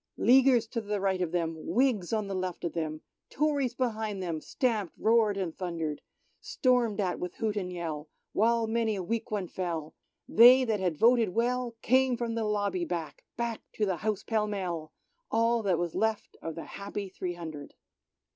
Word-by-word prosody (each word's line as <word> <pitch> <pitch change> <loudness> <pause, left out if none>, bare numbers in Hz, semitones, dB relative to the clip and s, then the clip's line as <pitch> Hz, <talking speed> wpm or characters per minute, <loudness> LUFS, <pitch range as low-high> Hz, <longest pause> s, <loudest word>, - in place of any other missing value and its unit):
' - - -52
Leaguers 255 -2 +5
to 230 +1 -4 0.2
right 190 -1 0
of 175 -3 -1
them, 165 -2 -1
Whigs 230 -2 +1
on 215 -2 0
the 195 - -4
left 185 -2 -3
of 170 - -2
them, 155 -2 -3 0.3
Tories 285 -4 0
behind 220 -5 -2
them, 165 -3 -3
stamped, 220 - -1
roared, 220 -2 +3
and 180 -5 -3
thundered. 165 -5 -3 0.4
Stormed 245 -6 +1
at 185 -3 0
with 180 -1 -5
hoot 220 -2 -1
and 185 -3 -3
yellj 160 -4 -4 0.3
while 230 +2 +3
many 225 -1 0
a 190 - -3
weak 225 +4 -2
one 205 -4 -2
fell. 165 -4 -4 0.3
They 250 +4 +8
that 220 -4 0
had 180 -5 -1
voted 230 +2 +5
well 245 0 0
came 260 0 +3
from 235 -1 -2
the 225 -1 -1
lobby 205 -4 0
back, 170 -2 -5
back 235 -1 -2
to 215 - 0
the 190 -3 -1
House 215 +2 -2
pell 215 -2 0
mell 175 -6 -3 0.2
— - - -46
All 230 +1 +2
that 190 -5 +1
was 175 -1 -2
left 220 -1 -1
of 165 -1 -5
the 165 - -6
happy 200 0 -6
three 180 -1 -5
hundred. 155 -4 -8
205 Hz, 185 wpm, -29 LUFS, 175-230 Hz, 0.4 s, They